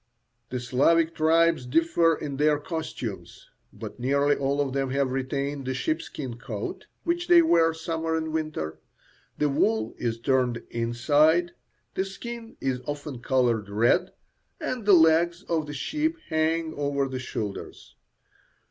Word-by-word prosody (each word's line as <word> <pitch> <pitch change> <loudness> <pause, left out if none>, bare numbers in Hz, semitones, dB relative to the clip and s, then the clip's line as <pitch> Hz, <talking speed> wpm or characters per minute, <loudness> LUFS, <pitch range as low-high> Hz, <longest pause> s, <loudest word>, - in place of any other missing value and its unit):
The 125 - -3
Slavic 160 +7 +2
tribes 165 -3 +3
differ 165 +3 +3
in 140 -3 -5
their 150 +1 +3
costumes, 160 +2 -6 0.2
but - - -9
nearly 140 +3 +2
all 140 +1 -1
of 140 -2 0
them 135 -1 0
have 135 0 0
retained 135 +1 -2
the 130 - -1
sheepskin 135 -4 -3
coat, 115 -5 -6 0.2
which 345 +1 -1
they 345 -1 +7
wear 165 - +4
summer 160 0 -2
and 160 -1 -2
winter. 150 - -3 0.6
The 150 - +2
wool 110 -5 +1
is 115 -1 -2
turned 125 -2 +1
inside. 145 +9 +2 0.4
The 190 - 0
skin 230 +4 -8
is 130 -2 -1
often 145 -3 -5
coloured 120 -5 +1
red, 120 - +2 0.5
and 245 -5 -4
the 205 - +7
legs 170 +2 +4
of 160 -5 -1
the 145 - -6
sheep 310 - -1
hang 160 0 0
over 140 -1 -1
the 130 -1 -4
shoulders. 105 -5 -6
145 Hz, 140 wpm, -26 LUFS, 130-165 Hz, 0.6 s, they